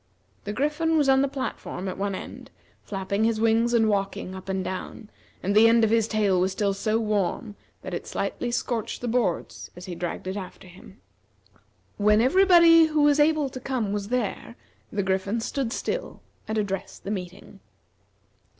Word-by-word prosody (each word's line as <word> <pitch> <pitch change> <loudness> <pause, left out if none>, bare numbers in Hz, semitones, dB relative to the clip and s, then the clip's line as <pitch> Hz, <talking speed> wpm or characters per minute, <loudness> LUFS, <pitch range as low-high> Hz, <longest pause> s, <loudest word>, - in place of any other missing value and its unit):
The 205 - -3
Griffin 300 +6 0
was 290 -3 +3
on 265 0 +5
the 275 - +2
platform 260 -8 -5
at 185 - -3
one 200 0 -2
end, - - -9 0.3
flapping 200 +1 -2
his 225 -1 +1
wings 225 +1 +3
and 230 -2 +3
walking 195 -2 -2
up 190 0 -9
and 190 -1 -1
down, 190 +3 -6 0.3
and 200 +2 0
the 220 +2 +7
end 230 0 +4
of 220 - +3
his 225 -1 +3
tail 205 -5 +1
was 190 +1 +1
still 200 0 0
so 215 +3 0
warm 210 +1 -1 0.3
that - - -6
it - - -5
slightly - - -3
scorched 240 -2 -2
the 245 - -3
boards 165 - -1
as 180 +1 -10
he 185 - -6
dragged 175 +1 -5
it 190 +1 -3
after 185 -1 -9
him. 190 +4 -15 1.0
When 210 +1 +4
everybody 335 +4 +6
who 310 -1 +1
was 295 0 +4
able 300 -1 +3
to 255 - -8
come 245 -6 -2
was 205 -1 -3
there, 235 -1 -3 0.4
the 200 -1 -1
Griffin 190 +4 -1
stood 240 +1 -2
still - - -4 0.3
and 220 0 -2
addressed 200 -2 -3
the 200 - -4
meeting. 190 0 -7
215 Hz, 180 wpm, -25 LUFS, 195-250 Hz, 1.0 s, the